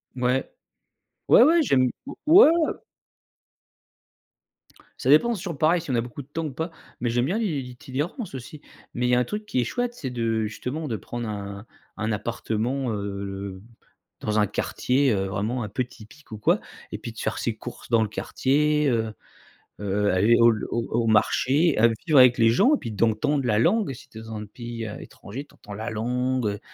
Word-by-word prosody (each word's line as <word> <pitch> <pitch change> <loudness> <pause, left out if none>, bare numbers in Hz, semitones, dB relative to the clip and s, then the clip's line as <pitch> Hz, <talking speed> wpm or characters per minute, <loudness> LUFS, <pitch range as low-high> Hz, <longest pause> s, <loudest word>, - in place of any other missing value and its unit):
Ouais, 125 +1 0 0.8
ouais, - - +8
ouais, 335 +2 +5
j'aime 135 - +3 0.2
heu, 285 - -5
ouais, 325 +3 +8
ouais. 330 -1 +2 2.3
Ça - - -1
dépend. 235 +12 +5
C'est 195 -3 -6
toujours 170 -6 -5
pareil 160 +4 +3
si 155 - -5
on 125 - +1
a 115 - +2
beaucoup 120 +4 -7
de 130 - -15
temps 160 +2 -4
ou 140 - -5
pas, 165 +4 -4 0.3
mais 120 - 0
j'aime 120 +1 +1
bien 185 +10 0
l'i 230 - 0
l'i - - -7
l'itinérance 135 - -5
aussi. 135 +4 -8 0.3
Mais 125 +1 0
il - - +1
y 125 - +4
a - - +3
un 125 - +1
truc 210 0 -5
qui 130 - -1
est - - +3
chouette, 245 - -2
c'est 135 - -5
de 115 -2 -1
justement, 130 +8 -4
de 115 - -2
prendre 120 +4 -5
un 100 0 -6 0.3
un 110 +1 -1
appartement, 120 +4 -2
heu - - -2
heu, 100 -1 -5 0.6
dans 105 0 0
un 105 - +3
quartier, 130 +6 0
heu, 95 -1 0
vraiment 105 +6 -2
un 105 - -5
peu 125 +6 -1
typique 125 +3 -16
ou 110 - -5
quoi 105 - +2 0.3
et - - -4
puis - - -7
de - - -11
faire - - -2
ses - - -1
courses - - -10
dans 115 -2 +4
le 105 - -3
quartier, 150 +5 +1
heu 110 -2 0 0.7
heu, 100 0 0
aller 105 +6 +4
au 115 - +7
l 110 - -3
au 120 -1 -1
au 115 0 +1
marché, 135 +8 +3
aller 115 +1 +4
vivre 150 -4 +5
avec 125 -1 +7
les 115 -1 +5
gens 250 - +4
et - - +1
puis 115 - -6
d'entendre 115 +7 +1
la 105 -2 +2
langue. 190 - +2
Si 130 - -14
tu 110 - -12
es - - -8
dans 110 0 -8
un 105 0 -6
pays, 115 +1 -7
heu, 105 - -7
étranger, 125 +8 -9
tu - - -23
entends 105 - -11
la 110 +3 -4
langue, 125 +2 -1
heu, 100 0 -4
120 Hz, 215 wpm, -25 LUFS, 110-145 Hz, 2.3 s, ouais